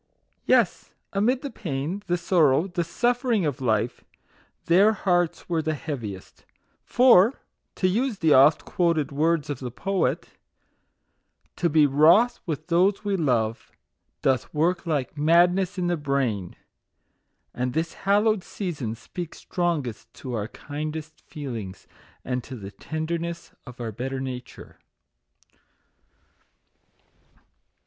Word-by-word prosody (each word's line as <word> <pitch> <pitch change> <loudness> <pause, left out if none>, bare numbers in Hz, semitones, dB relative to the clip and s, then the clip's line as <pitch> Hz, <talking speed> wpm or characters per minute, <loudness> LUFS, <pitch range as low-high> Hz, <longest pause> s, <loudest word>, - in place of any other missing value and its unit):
Yes, 205 -10 +2 0.2
amid 240 +7 +1
the 280 - -4
pain, 160 +3 -4
the 175 0 +1
sorrow, 165 -4 +3
the 175 -2 -2
suf 240 +9 0
fering 225 - +1
of 140 -3 -4
life, 115 -1 0 0.6
their 195 +6 +5
hearts 175 -4 0
were 165 -2 0
the 155 0 -1
heaviest; 115 - -7 0.4
for 245 -1 +5 0.4
(to 185 - +1
use 225 +4 0
the 160 -5 +3
oft 140 +4 +5
quoted 170 -6 0
words 155 +1 +1
of 140 - -5
the 125 - -5
poet) 195 +10 -1 0.7
" - - -46
to 170 - +1
be 155 -1 +5
wroth 165 - +5
with 155 -4 -3
those 185 +4 +2
we 200 -1 +1
love, 120 - 0 0.5
doth 130 -4 +1
work 170 +3 0
like 145 -2 -2
madness 175 +5 +3
in 180 - -1
the 175 0 0
brain;" 135 - -1 1.0
and 125 0 -2
this 160 +1 -1
hallowed 205 0 +2
sea 190 -1 -4
son 120 -8 -4
speaks 170 +8 -8
strongest 160 - -3
to 130 -2 -7
our 105 -2 -2
kindest 155 +4 -7
feelings, 115 -10 -7 0.4
and 125 -1 -2
to 130 - -8
the 100 -4 -8
tenderness 170 +5 -4 0.2
of 125 0 -11
our 115 -2 -4
better 130 +5 -4
nature. 125 -2 -8
160 Hz, 130 wpm, -25 LUFS, 130-180 Hz, 1.0 s, their